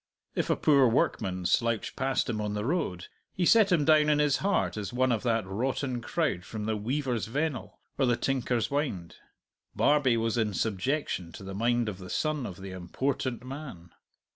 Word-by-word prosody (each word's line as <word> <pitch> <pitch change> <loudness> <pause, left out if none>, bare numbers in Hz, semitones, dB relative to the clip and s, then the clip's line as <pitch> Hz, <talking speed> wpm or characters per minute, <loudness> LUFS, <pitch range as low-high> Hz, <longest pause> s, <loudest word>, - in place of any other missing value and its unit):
If - - -1
a - - +3
poor 140 -4 +4
workman 95 -5 0
slouched 115 +5 +1
past 135 0 0
him 110 -4 -2
on 105 0 -2
the 105 +1 -2
road, 130 - -1 0.3
he 180 - +1
set 215 0 +5
him 160 -5 +3
down 155 0 +5
in 150 - +4
his 150 -2 +3
heart 200 0 0
as 105 -2 -4
one 130 +1 +2
of 115 -3 +1
that 115 -4 0
rotten 125 +5 -2
crowd 120 - -1
from 105 +3 -6
the 110 0 0
Weaver's 120 +1 -2
Vennel 145 +4 -3 0.2
or 135 - +3
the 120 -1 +2
Tinker's 125 -3 0
Wynd. 130 - -2 0.6
Barbie 140 -5 +3
was 115 +1 0
in 105 -3 0
subjection 105 - -1
to - - -9
the 95 0 -6
mind 120 +3 +1
of 100 -3 -4
the 95 -1 -9
son 155 - -1
of 90 - -8
the 95 0 -7
important 125 +8 -3
man. 130 - -8
120 Hz, 190 wpm, -29 LUFS, 105-140 Hz, 0.6 s, set